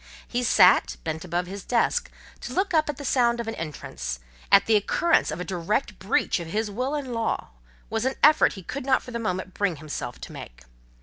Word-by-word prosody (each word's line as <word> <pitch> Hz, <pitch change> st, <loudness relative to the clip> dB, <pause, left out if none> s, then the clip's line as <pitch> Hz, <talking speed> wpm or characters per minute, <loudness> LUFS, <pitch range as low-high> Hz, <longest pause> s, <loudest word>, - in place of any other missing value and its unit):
He 245 Hz, -, -1 dB
sat, 190 Hz, -6 st, +5 dB
bent 160 Hz, 0 st, -3 dB
above 175 Hz, 0 st, -2 dB
his 195 Hz, +1 st, -7 dB
desk: 240 Hz, -2 st, +1 dB, 0.3 s
to -, -, -7 dB
look 380 Hz, 0 st, 0 dB
up 310 Hz, -2 st, +3 dB
at 295 Hz, -, -3 dB
the 285 Hz, -, -7 dB
sound 240 Hz, -2 st, +2 dB
of 235 Hz, -, -4 dB
an 225 Hz, -, -2 dB
entrance, 60 Hz, -, -5 dB, 0.3 s
at 200 Hz, -, +7 dB
the 225 Hz, -, +3 dB
occurrence 270 Hz, -, +2 dB
of 155 Hz, +2 st, -4 dB
a -, -, -2 dB
direct 195 Hz, +5 st, -2 dB
breach 190 Hz, 0 st, +1 dB
of 170 Hz, -, -6 dB
his 210 Hz, +5 st, -2 dB
will 255 Hz, +7 st, -2 dB
and 270 Hz, -4 st, -4 dB
law, 230 Hz, -, -2 dB, 0.4 s
was 225 Hz, 0 st, -2 dB
an 265 Hz, -, 0 dB
effort 305 Hz, +1 st, +6 dB
he 190 Hz, -, -9 dB
could 270 Hz, +10 st, -5 dB
not 260 Hz, 0 st, +2 dB
for 250 Hz, -, -9 dB
the 235 Hz, -, -3 dB
moment 185 Hz, -3 st, -3 dB
bring 200 Hz, -4 st, 0 dB
himself 155 Hz, 0 st, -6 dB
to -, -, -8 dB
make. -, -, -10 dB
210 Hz, 220 wpm, -25 LUFS, 175-250 Hz, 0.4 s, at